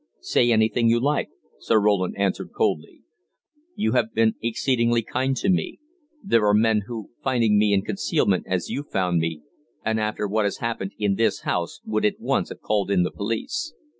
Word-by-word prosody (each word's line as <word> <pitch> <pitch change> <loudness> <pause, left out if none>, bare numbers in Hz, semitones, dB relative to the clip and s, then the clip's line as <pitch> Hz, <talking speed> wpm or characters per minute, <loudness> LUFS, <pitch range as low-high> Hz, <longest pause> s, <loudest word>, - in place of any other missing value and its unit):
"Say 120 - +2
anything 115 +1 +3
you 120 +1 +3
like," 145 +4 0 0.3
Sir 110 - +2
Roland 100 -3 +1
answered 100 -1 -1
coldly. 75 - -1 0.7
"You 110 - 0
have 120 -2 0
been 110 0 +3
exceedingly 115 0 +1
kind 130 +4 -1
to 120 - -1
me: 185 -2 0 0.5
there 115 - +3
are 105 - +4
men 110 -1 +2
who, 115 -4 -7
finding 115 -6 +2
me 105 0 +3
in 95 -1 +2
concealment 120 - 0
as 90 -2 -1
you 140 - -2
found 90 - 0
me, 80 -2 -3 0.4
and 110 0 +1
after 105 -1 -1
what 105 +1 0
has 100 - -1
happened 115 -4 -3
in 105 -2 +1
this 115 - +1
house, - - -2
would 110 0 -1
at 105 - +1
once - - 0
have - - -10
called 105 -2 0
in 95 -3 +3
the 90 - -2
police. 260 - -3
110 Hz, 185 wpm, -24 LUFS, 100-120 Hz, 0.7 s, are